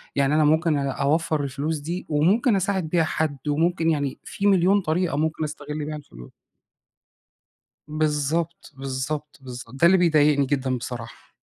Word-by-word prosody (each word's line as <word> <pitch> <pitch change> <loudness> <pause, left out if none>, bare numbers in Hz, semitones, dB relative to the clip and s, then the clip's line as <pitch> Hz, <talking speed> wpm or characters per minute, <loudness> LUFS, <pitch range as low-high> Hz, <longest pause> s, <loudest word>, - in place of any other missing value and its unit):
يعني 140 +1 +2
أنا 155 -1 +4
ممكن 160 +1 +3
أ 140 -1 -1
أوفّر 155 +3 0
الفلوس 140 +3 -2
دي 170 +5 -5
وممكن 195 - +3
أساعد 190 -4 -1
بيها 170 -1 +2
حد، 155 -2 -1
وممكن 165 +2 +1
يعني 145 -4 -1
فيه 200 - -2
مليون 195 +1 +4
طريقة 165 -2 0
ممكن 155 +1 -1
أستغل 150 0 -5
بيها 155 +1 -4
الفلوس. - - -12 1.6
بالضبط، 155 +2 -1
بالضبط، 135 +3 -4
بالضبط 125 -2 -9
ده 170 - +6
اللي 190 +2 +6
بيضايقني 150 -5 +3
جدًا 130 -2 0
بصراحة. 120 -1 -8
155 Hz, 145 wpm, -24 LUFS, 140-170 Hz, 1.6 s, ده